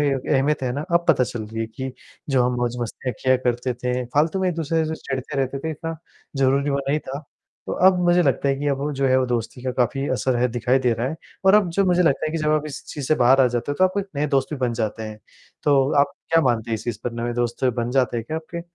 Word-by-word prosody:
ये 145 Hz, -1 st, +2 dB, 0.2 s
अहमियत 140 Hz, +1 st, +1 dB
है 125 Hz, -, -1 dB
ना, 145 Hz, +4 st, -3 dB
अब 170 Hz, 0 st, +3 dB
पता 125 Hz, -, +5 dB
चल 120 Hz, -2 st, -5 dB
रही 115 Hz, +1 st, -5 dB
है 115 Hz, -, -1 dB
कि, 130 Hz, +3 st, -6 dB, 0.4 s
जो 130 Hz, -2 st, +4 dB
हम 125 Hz, 0 st, 0 dB
मौज़-मस्तियाँ 120 Hz, +1 st, -3 dB
किया 130 Hz, 0 st, +4 dB
करते 120 Hz, +1 st, -3 dB
थे, 125 Hz, 0 st, -2 dB
फालतू 160 Hz, +6 st, +2 dB
में 185 Hz, -, +2 dB
एक-दूसरे 165 Hz, -1 st, 0 dB
से 160 Hz, +1 st, -2 dB
चिढ़ते 135 Hz, 0 st, -5 dB
रहते 135 Hz, +1 st, -2 dB
थे, 160 Hz, +4 st, -3 dB
इतना 165 Hz, +1 st, -5 dB, 0.4 s
ज़रूरी 135 Hz, +1 st, +2 dB
वो 140 Hz, -, +1 dB
नहीं 150 Hz, +2 st, +2 dB
था, 140 Hz, +1 st, -7 dB, 0.4 s
तो -, -, -3 dB
अब 190 Hz, -1 st, +5 dB
मुझे 175 Hz, 0 st, +4 dB
लगता 140 Hz, -, +1 dB
है 135 Hz, -, +3 dB
कि 145 Hz, +1 st, -3 dB
अब 140 Hz, -1 st, 0 dB
वो 145 Hz, +2 st, -2 dB
जो 135 Hz, 0 st, 0 dB
है 130 Hz, -, +4 dB
वो 130 Hz, -, +1 dB
दोस्ती 120 Hz, 0 st, -3 dB
का 130 Hz, -, -1 dB
काफ़ी 135 Hz, +3 st, 0 dB
असर 130 Hz, 0 st, 0 dB
है, 125 Hz, +1 st, +2 dB
दिखाई 125 Hz, +2 st, +1 dB
दे 125 Hz, -2 st, +2 dB
रहा 115 Hz, +3 st, -2 dB
है 160 Hz, -, -5 dB, 0.3 s
और 190 Hz, +1 st, +6 dB
अब 210 Hz, -4 st, +4 dB
जो 195 Hz, +2 st, +2 dB
मुझे 180 Hz, -1 st, +3 dB
लगता 155 Hz, -2 st, +2 dB
है -, -, -2 dB
कि 165 Hz, -, -1 dB
जब 155 Hz, 0 st, 0 dB
आप 155 Hz, 0 st, +1 dB
इस 145 Hz, -2 st, -7 dB
चीज़ 140 Hz, -3 st, -5 dB
से 155 Hz, -, +3 dB
बाहर 130 Hz, 0 st, +5 dB
आ 130 Hz, -, +6 dB
जाते 120 Hz, +3 st, -2 dB
हो, -, -, -3 dB
तो 185 Hz, -, +5 dB
आपको 185 Hz, +2 st, +1 dB
एक 195 Hz, -, -8 dB
नए 150 Hz, +1 st, +1 dB
दोस्त 135 Hz, -2 st, +1 dB
भी 150 Hz, -, -2 dB
बन 125 Hz, -2 st, 0 dB
जाते 110 Hz, -1 st, -3 dB
हैं। 110 Hz, -1 st, -7 dB, 0.4 s
तो, 140 Hz, -2 st, +3 dB
आप 140 Hz, 0 st, +3 dB, 0.2 s
क्या 165 Hz, -, +6 dB
मानते 115 Hz, -2 st, 0 dB
हैं -, -, +1 dB
इस 110 Hz, -, -6 dB
चीज़ 115 Hz, -3 st, -3 dB
पर 125 Hz, -, -2 dB
नए 120 Hz, 0 st, -1 dB
दोस्त 120 Hz, +1 st, -1 dB
बन 120 Hz, -1 st, 0 dB
जाते 125 Hz, -2 st, +1 dB
हैं 115 Hz, -, -3 dB
क्या 155 Hz, -, -3 dB
आपके? 170 Hz, +1 st, -6 dB
135 Hz, 280 wpm, -23 LUFS, 125-150 Hz, 0.4 s, और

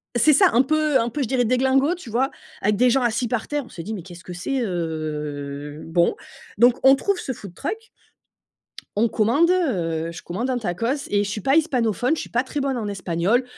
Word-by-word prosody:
c'est 305 Hz, +6 st, +5 dB
ça 285 Hz, -, +6 dB
un 245 Hz, -, +5 dB
peu, 305 Hz, 0 st, +2 dB
un 230 Hz, +1 st, 0 dB
peu 290 Hz, -, -3 dB
je 255 Hz, -, 0 dB
dirais, 245 Hz, 0 st, +1 dB
déglingo, 265 Hz, +6 st, +2 dB
tu 345 Hz, -10 st, -11 dB
vois, 260 Hz, +5 st, 0 dB, 0.3 s
avec 210 Hz, +1 st, +2 dB
des 250 Hz, +4 st, +4 dB
gens 265 Hz, +2 st, +3 dB
assis 235 Hz, +1 st, 0 dB
par 230 Hz, -1 st, -2 dB
terre, 295 Hz, -3 st, -2 dB
on -, -, -16 dB
se 170 Hz, -, -8 dB
dit: 220 Hz, +6 st, -5 dB
«Mais 195 Hz, -, -5 dB
qu'est-ce 175 Hz, -2 st, -12 dB
que 180 Hz, -, -8 dB
c'est?» 255 Hz, +10 st, -2 dB
heu, 150 Hz, -5 st, -4 dB
bon. 170 Hz, +1 st, +2 dB, 0.4 s
Donc 240 Hz, +2 st, +5 dB
on 270 Hz, +1 st, +8 dB
trouve 395 Hz, +6 st, -1 dB
ce 260 Hz, -, -4 dB
food 200 Hz, -6 st, -11 dB
truck. 440 Hz, -, -5 dB, 1.1 s
On 230 Hz, +3 st, +3 dB
commande, 235 Hz, +11 st, +2 dB
heu, 170 Hz, -, 0 dB
je 165 Hz, -, -9 dB
commande 230 Hz, +9 st, -3 dB
un 250 Hz, -, 0 dB
tacos 230 Hz, -, -2 dB
et 205 Hz, 0 st, +1 dB
je 200 Hz, -, -4 dB
suis 210 Hz, -, -3 dB
pas 270 Hz, +8 st, +2 dB
hispanophone, 250 Hz, -3 st, +1 dB
je -, -, -4 dB
suis -, -, -7 dB
pas 245 Hz, +2 st, +1 dB
très 285 Hz, +2 st, -4 dB
bonne 270 Hz, -2 st, -1 dB
en 215 Hz, -3 st, -3 dB
Espagnol 195 Hz, +5 st, 0 dB
235 Hz, 225 wpm, -23 LUFS, 180-270 Hz, 1.1 s, on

